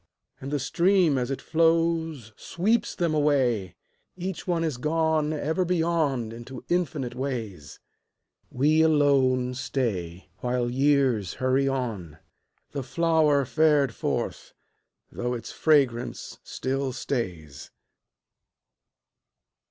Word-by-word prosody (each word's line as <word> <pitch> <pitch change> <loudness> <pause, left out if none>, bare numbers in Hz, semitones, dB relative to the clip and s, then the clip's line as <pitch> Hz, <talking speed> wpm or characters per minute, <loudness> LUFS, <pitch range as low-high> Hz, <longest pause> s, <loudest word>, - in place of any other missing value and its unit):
And 135 - -6
the 145 - 0
stream 170 +1 +2
as 125 0 -2
it 135 - -4
flows 165 -6 +1
Sweeps 215 +7 -1
them 170 -3 0
away, 130 -10 +1 0.4
Each 185 0 -5
one 170 -2 0
is 155 -6 -2
gone 155 +2 +1
Ever 155 +4 -1
beyond 160 -9 0
into 120 +2 -9
infinite 155 -8 -1
ways. 115 - -5 0.7
We 150 +5 +3
alone 135 -5 +3
stay 95 -10 -3
While 125 -1 -1
years 130 -7 +2
hurry 130 +1 +1
on, 110 - -3 0.5
The 140 - -3
flower 155 0 +2
fared 150 -3 +3
forth, - - -3 0.6
though 125 +1 -3
its 115 - -7
fragrance 135 -7 +1
still 135 0 -3
stays. 90 - -4
140 Hz, 105 wpm, -26 LUFS, 125-160 Hz, 0.7 s, We